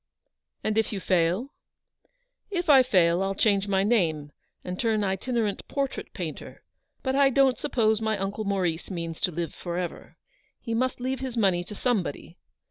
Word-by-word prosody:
"And 215 Hz, 0 st, +1 dB
if 220 Hz, -, 0 dB
you 205 Hz, -, -3 dB
fail—" 185 Hz, +8 st, +1 dB, 1.0 s
"If 355 Hz, -5 st, +1 dB
I 270 Hz, -2 st, +9 dB
fail, 180 Hz, -8 st, +3 dB
I'll 195 Hz, 0 st, -1 dB
change 200 Hz, -1 st, +2 dB
my 195 Hz, -1 st, +2 dB
name, 165 Hz, -10 st, +1 dB, 0.3 s
and 180 Hz, 0 st, -5 dB
turn 220 Hz, -3 st, +1 dB
itinerant 205 Hz, +2 st, -1 dB
portrait 275 Hz, -1 st, -3 dB
painter. -, -, -7 dB, 0.4 s
But 265 Hz, 0 st, 0 dB
I 275 Hz, 0 st, +5 dB
don't 270 Hz, -1 st, +3 dB
suppose 220 Hz, -6 st, +1 dB
my 220 Hz, -1 st, 0 dB
uncle 195 Hz, +2 st, -3 dB
Maurice 185 Hz, -5 st, -1 dB
means 165 Hz, -3 st, -5 dB
to 180 Hz, -, +1 dB
live 170 Hz, 0 st, -3 dB
for 175 Hz, -1 st, -5 dB
ever. 180 Hz, -1 st, -5 dB, 0.4 s
He 230 Hz, -, -4 dB
must 255 Hz, +3 st, 0 dB
leave 260 Hz, +1 st, -2 dB
his 260 Hz, -3 st, -5 dB
money 190 Hz, -5 st, +2 dB
to 210 Hz, -, -8 dB
somebody. 190 Hz, -, -2 dB
205 Hz, 165 wpm, -26 LUFS, 180-245 Hz, 1.0 s, I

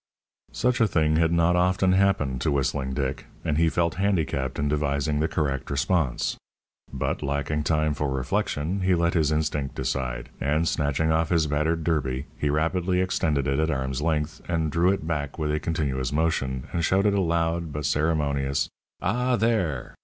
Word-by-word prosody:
Such 125 Hz, -1 st, 0 dB
a 115 Hz, -, +5 dB
thing 80 Hz, -4 st, +2 dB
had 80 Hz, 0 st, +3 dB
not 85 Hz, +1 st, +3 dB
often 90 Hz, +1 st, +3 dB
happened 95 Hz, -10 st, +2 dB
to 75 Hz, -, +1 dB
Whistling 65 Hz, -1 st, -1 dB
Dick, 65 Hz, -2 st, -3 dB, 0.2 s
and 75 Hz, 0 st, +1 dB
he 85 Hz, 0 st, +4 dB
felt 85 Hz, 0 st, 0 dB
handicapped 80 Hz, -9 st, 0 dB
in 75 Hz, -, 0 dB
devising 75 Hz, 0 st, 0 dB
the 80 Hz, -, +2 dB
correct 70 Hz, -4 st, -2 dB
response. 70 Hz, -1 st, 0 dB, 0.5 s
But -, -, -2 dB
lacking 70 Hz, +2 st, -1 dB
time 75 Hz, -1 st, +2 dB
for 75 Hz, 0 st, -2 dB
reflection, 75 Hz, +6 st, -1 dB
he 95 Hz, 0 st, +3 dB
let 85 Hz, 0 st, +1 dB
his 80 Hz, -4 st, +2 dB
instinct 75 Hz, -3 st, -1 dB
decide, -, -, -3 dB
and 75 Hz, +4 st, +1 dB
snatching 75 Hz, +1 st, +1 dB
off 80 Hz, 0 st, +1 dB
his 85 Hz, -3 st, +3 dB
battered 75 Hz, +2 st, 0 dB
derby, 70 Hz, -5 st, -1 dB
he 75 Hz, -, 0 dB
rapidly 85 Hz, +5 st, +1 dB
extended 80 Hz, -6 st, 0 dB
it 70 Hz, +2 st, 0 dB
at 80 Hz, +1 st, +1 dB
arm's 65 Hz, -1 st, -2 dB
length, 75 Hz, 0 st, -1 dB
and 80 Hz, -3 st, 0 dB
drew 85 Hz, +3 st, +3 dB
it 95 Hz, -5 st, -2 dB
back 75 Hz, -3 st, -3 dB
with 75 Hz, -2 st, -1 dB
a 75 Hz, -, 0 dB
continuous 70 Hz, -6 st, -1 dB
motion, 70 Hz, -5 st, 0 dB
and 85 Hz, -, 0 dB
shouted 100 Hz, +4 st, +3 dB
a 100 Hz, -, +2 dB
loud, 85 Hz, -1 st, 0 dB
but 75 Hz, 0 st, -4 dB
ceremonious, 75 Hz, -3 st, 0 dB, 0.3 s
"Ah, 125 Hz, +2 st, +1 dB
there!" 105 Hz, -, 0 dB
75 Hz, 175 wpm, -25 LUFS, 70-85 Hz, 0.5 s, a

